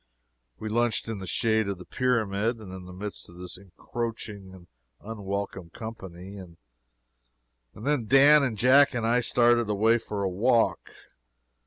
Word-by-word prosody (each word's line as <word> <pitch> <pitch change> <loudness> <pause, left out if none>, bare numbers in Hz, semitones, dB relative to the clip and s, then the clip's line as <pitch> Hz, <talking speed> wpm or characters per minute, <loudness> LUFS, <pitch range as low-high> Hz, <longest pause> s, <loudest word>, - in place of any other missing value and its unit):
We 110 - -6
lunched 115 +1 0
in 110 -3 -4
the 95 - -7
shade 110 +1 +1
of 100 - -3
the 90 - -11
pyramid, 115 -3 0
and 100 -4 -10
in 95 -1 -9
the 90 - -10
midst 100 +3 -7
of 85 - -14
this 90 0 -7
encroaching 100 +1 -6
and 95 -2 -14 0.3
unwelcome 100 -4 -5
company, 95 -2 -9
and 90 -3 -12 1.2
then 125 +1 -1
Dan 140 +4 +7
and 125 -6 -1
Jack 130 +4 +5
and 115 -2 -1
I 120 +2 +3
started 120 -1 +3
away 110 +3 +3
for 105 -2 -4
a - - +1
walk. 115 +6 +1
110 Hz, 155 wpm, -27 LUFS, 95-120 Hz, 1.2 s, Dan